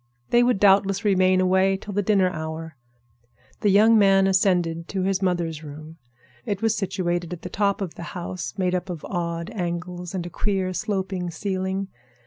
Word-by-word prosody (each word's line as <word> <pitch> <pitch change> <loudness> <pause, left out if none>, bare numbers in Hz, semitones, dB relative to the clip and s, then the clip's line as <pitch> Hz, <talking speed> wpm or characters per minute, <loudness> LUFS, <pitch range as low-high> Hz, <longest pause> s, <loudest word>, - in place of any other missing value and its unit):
They 240 - +5
would 245 -4 +2
doubtless 195 0 +4
remain 185 -2 +4
away 190 +1 +3
till 205 +1 -8
the 205 - +1
dinner 195 -2 +2
hour. 160 -1 -6 0.8
The 205 - +2
young 215 +3 +6
man 195 -1 +5
ascended 180 -3 +1
to 190 -2 -2
his 195 0 0
mother's 170 -4 -1
room. 155 +2 -10 0.5
It 200 +5 -3
was 225 -1 +2
situated 175 -3 -2
at 175 - -9
the - - -5
top 200 0 0
of 185 -4 -3
the - - -10 0.2
house, 170 -8 -5
made 180 -1 0
up 180 +1 -2
of 170 -4 -6
odd 170 0 -3
angles 180 -2 -4
and 175 -2 -3
a - - -5
queer, 190 -2 -1
sloping 190 -3 -2
ceiling. 190 +2 -3
185 Hz, 175 wpm, -24 LUFS, 175-195 Hz, 0.8 s, young